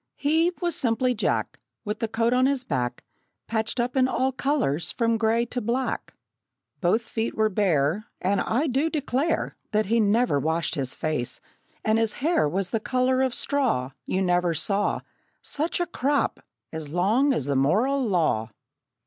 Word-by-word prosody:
He, 320 +4 +2
was 345 -2 -1
simply 250 +1 +1
Jack, 225 - -1 0.3
With 210 +1 -3
the 225 - -1
coat 230 +2 +1
on 255 +1 +4
his 275 -2 0
back 125 - -2 0.4
Patched 220 +2 -1
up 245 +2 -1
in 260 -1 +4
all 260 0 +1
colors 255 - 0
from 230 -1 +1
gray 230 +1 +2
to 245 +1 -4
black. 245 +4 -2 0.6
Both 195 +6 +2
feet 225 0 -3
were 220 0 +2
bare; 185 0 +1
And 195 +2 +1
I 255 +8 0
do 280 +3 +1
declare 295 0 -1 0.2
That 215 +1 +2
he 230 +3 +2
never 215 -5 +3
washed 160 +3 0
his 130 -3 -3
face; 150 -6 -3 0.5
and 220 +1 +3
his 225 -1 +1
hair 300 - +1
Was 185 +3 -2
the 225 - +1
color 255 +3 +1
of 260 -2 +1
straw 240 - 0 0.2
You 190 +1 0
never 175 -2 +2
saw 200 +5 0 0.4
Such 315 +5 -1
a 350 - +1
crop 285 -4 0 0.3
as 160 -2 -5
long 210 - +2
as 190 - 0
the 140 -1 0
moral 215 - +2
law! 165 - +1
225 Hz, 165 wpm, -25 LUFS, 180-260 Hz, 0.6 s, on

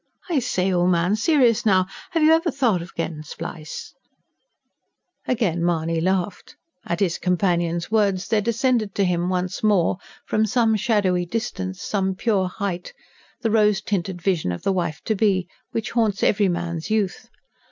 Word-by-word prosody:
I 310 - +3
say, 190 -6 0
old 175 0 +3
man, 180 +3 +2
serious 245 -2 +3
now, 190 -4 +4 0.2
have 330 -2 +1
you 310 - +6
never 325 +2 +4
thought 230 - +1
o' 170 - -7
gettin' 160 -2 -3
spliced?" 155 0 -7 1.3
Again 185 -9 0
Mahony 165 -1 0
laughed. 185 +1 -2 0.3
At 170 +4 -2
his 180 -4 +1
companion's 175 -1 0
words 200 -4 +1
there 220 -2 +2
descended 230 -1 0
to 200 - +2
him, 175 0 0
once 180 0 -2
more, 200 -4 +2 0.3
from 215 0 +1
some 225 0 +2
shadowy 195 -5 +1
distance, 190 -3 -4
some 190 -2 -1
pure 195 -3 +1
height, 180 -2 -4 0.5
the 225 -3 0
rose 210 -2 +4
tinted 185 -3 -3
vision 175 - +1
of 85 - -6
the 195 - +1
wife 170 -5 -2
to 220 - 0
be 195 -4 +1 0.2
which 225 - -3
haunts 220 -4 +1
every 200 -2 +3
man's 170 -1 -3
youth. 215 -4 -1
190 Hz, 160 wpm, -23 LUFS, 175-220 Hz, 1.3 s, you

